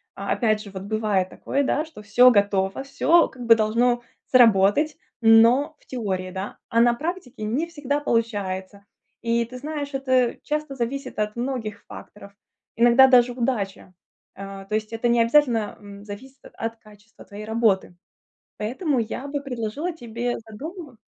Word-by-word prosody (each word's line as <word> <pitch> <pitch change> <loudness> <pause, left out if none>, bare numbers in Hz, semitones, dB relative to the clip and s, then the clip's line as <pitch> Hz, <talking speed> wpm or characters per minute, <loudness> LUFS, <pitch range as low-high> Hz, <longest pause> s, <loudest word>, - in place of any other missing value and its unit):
А, - - -4
опять 215 -3 +1
же, 200 - -11
вот 190 -1 -7
бывает 205 -3 0
такое, 280 +8 -2
да, 300 +3 0
что 315 -9 -13
всё 240 +5 +6
готово, 200 +1 +1
всё, 325 +4 +3
как 245 -2 -10
бы, 230 0 +7
должно 235 +3 +1 0.3
сработать, 235 +5 +4 0.2
но- 235 +7 +5
в - - -28
теории, 190 -7 -4
да. 190 +2 -6
А 230 - +2
на 240 0 +5
практике 305 -6 -5
не 250 +10 -1
всегда 290 -4 -2
получается. 200 -6 -2 0.4
И 235 0 +1
ты 250 +2 -10
знаешь, 290 +1 -5
это 260 -2 +1
часто 300 -2 -3
зависит 265 +1 -4
от 210 0 -1
многих 235 -4 -4
факторов. 200 -1 -12 0.4
Иногда 240 +3 +6
даже 245 -1 +5
удача. 225 -7 -3 0.4
Э, 195 0 -8
то 215 - -1
есть 215 +1 -3
это 225 +1 -1
необязательно, 235 -1 +2
м, 200 0 -12
зависит 255 +7 -10
от - - -14
от 225 0 -4
качества 210 0 -18
твоей 205 +1 -9
работы. 220 -5 +1 0.6
Поэтому 260 - -1
я 235 +4 -4
бы 285 0 -3
предложила 260 +5 -4
тебе 240 -4 -4
задума 300 - -9
235 Hz, 155 wpm, -23 LUFS, 210-265 Hz, 0.6 s, бы